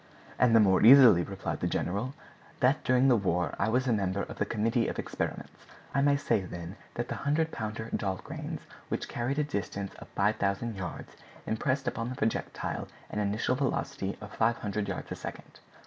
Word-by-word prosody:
"And 120 -2 +5
the - - +8
more 95 -3 +5
easily," 120 -6 +9
replied 95 +2 -4
the - - 0
general, 105 +10 -2 0.4
"that 135 +3 +3
during 130 +1 +4
the 130 - +6
war 90 -4 0
I 100 - +2
was 125 +3 +2
a 120 - +3
member 100 -1 0
of - - -8
the 105 - +1
committee 115 +2 +1
of - - -3
experiments. - - -4 0.3
I 140 - +2
may 140 0 +4
say, 140 - +1
then, 85 0 -7 0.2
that 120 +1 -2
the - - -3
100 155 +3 +1
pounder 110 +1 -4
Dahlgrens, 95 -2 -4 0.3
which - - -2
carried 125 +4 -2
a 150 - +3
distance 100 -7 -4
of - - -11
5,000 105 +2 +1
yards, 95 -2 -6 0.3
impressed 130 +4 -1
upon 115 0 -2
their 130 - -4
projectile 115 - -2 0.2
an - - -2
initial 105 +4 0
velocity 125 -7 -2
of 105 -1 -9
500 105 -3 0
yards - - -5
a - - -2
second. - - -9
110 Hz, 180 wpm, -30 LUFS, 100-125 Hz, 0.4 s, easily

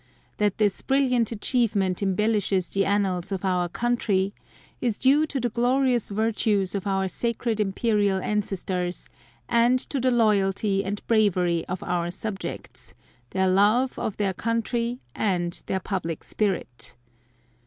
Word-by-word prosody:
That 210 -2 +1
this 205 -2 +1
brilliant 255 -4 +2
achievement 210 -5 0
embellishes 200 -1 +1
the 195 0 +1
annals 195 -3 0
of 195 0 -3
Our 180 -2 +1
country, 205 -3 0 0.5
is 230 -4 0
due 285 +4 +4
to 280 - -3
the 245 -1 0
glorious 245 +1 +1
virtues 210 -2 0
of 200 0 -3
Our 195 -1 +1
Sacred 230 +2 -2
Imperial 205 -1 +1
ancestors, 185 -3 -2 0.4
and 240 +2 +4
to 270 +2 -3
the 255 +1 +2
loyalty 200 -3 +2
and 205 +1 -4
bravery 180 -7 +2
of 180 0 -4
Our 175 -1 -1
subjects, 195 +2 -7 0.3
their 190 0 +1
love 210 +7 +3
of 210 - -3
their 200 -2 0
country 230 +3 -1 0.2
and 175 -4 -1
their 190 - 0
public 175 -4 -4
spirit. 125 - -3
205 Hz, 130 wpm, -25 LUFS, 190-230 Hz, 0.5 s, due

